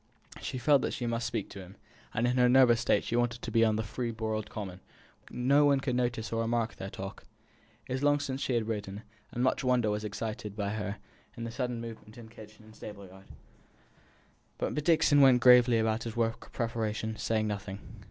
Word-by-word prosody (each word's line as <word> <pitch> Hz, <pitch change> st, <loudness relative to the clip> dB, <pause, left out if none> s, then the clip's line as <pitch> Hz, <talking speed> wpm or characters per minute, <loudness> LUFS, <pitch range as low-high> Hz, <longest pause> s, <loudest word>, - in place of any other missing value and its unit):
She -, -, -4 dB
felt 140 Hz, +2 st, +4 dB
that -, -, -2 dB
she 120 Hz, -, -4 dB
must 115 Hz, 0 st, -1 dB
speak 115 Hz, -4 st, -3 dB
to 100 Hz, -, -9 dB
him, 95 Hz, +1 st, -11 dB, 0.4 s
and 115 Hz, -, 0 dB
in 125 Hz, +1 st, +1 dB
her 125 Hz, 0 st, +5 dB
nervous 125 Hz, -2 st, +5 dB
state 110 Hz, -4 st, +2 dB
she 115 Hz, -, -3 dB
wanted 120 Hz, 0 st, 0 dB
to -, -, -4 dB
be 115 Hz, -, +4 dB
out -, -, +5 dB
on 110 Hz, -, 0 dB
the 110 Hz, -, -1 dB
free 120 Hz, +3 st, -4 dB
broad 110 Hz, -1 st, -3 dB
common, 95 Hz, -4 st, -6 dB, 0.5 s
where -, -, -8 dB
no 145 Hz, +2 st, +6 dB
one 140 Hz, -1 st, +4 dB
could 135 Hz, -2 st, -2 dB
notice 120 Hz, -3 st, -1 dB
or 115 Hz, -, 0 dB
remark 115 Hz, 0 st, -1 dB
their 95 Hz, -, -6 dB
talk. 95 Hz, 0 st, -8 dB, 0.6 s
It -, -, -5 dB
was 130 Hz, -, -2 dB
long 145 Hz, 0 st, +3 dB
since 135 Hz, -1 st, -4 dB
she 125 Hz, -, 0 dB
had 115 Hz, -2 st, 0 dB
ridden, 105 Hz, -1 st, -4 dB, 0.3 s
and 120 Hz, -, -2 dB
much 130 Hz, -, +1 dB
wonder 125 Hz, -4 st, +2 dB
was 105 Hz, +1 st, -2 dB
excited 110 Hz, 0 st, -5 dB
by 105 Hz, 0 st, -3 dB, 0.5 s
the 115 Hz, -, -4 dB
sudden 125 Hz, -1 st, -3 dB
movement 110 Hz, -1 st, -9 dB
in 115 Hz, -2 st, -11 dB
kitchen 110 Hz, -1 st, -14 dB
and 110 Hz, 0 st, -16 dB
stable 105 Hz, -2 st, -9 dB
yard. 95 Hz, +1 st, -15 dB, 1.3 s
But -, -, -2 dB
Dixon 160 Hz, -3 st, +4 dB
went 130 Hz, -2 st, +7 dB
gravely 125 Hz, -1 st, +7 dB
about 110 Hz, 0 st, 0 dB
his 115 Hz, -, -5 dB
work 115 Hz, -1 st, -1 dB
of -, -, -21 dB
preparation, 110 Hz, -2 st, -2 dB
saying 110 Hz, -1 st, 0 dB
nothing. 100 Hz, -2 st, -4 dB
115 Hz, 210 wpm, -30 LUFS, 110-125 Hz, 1.3 s, went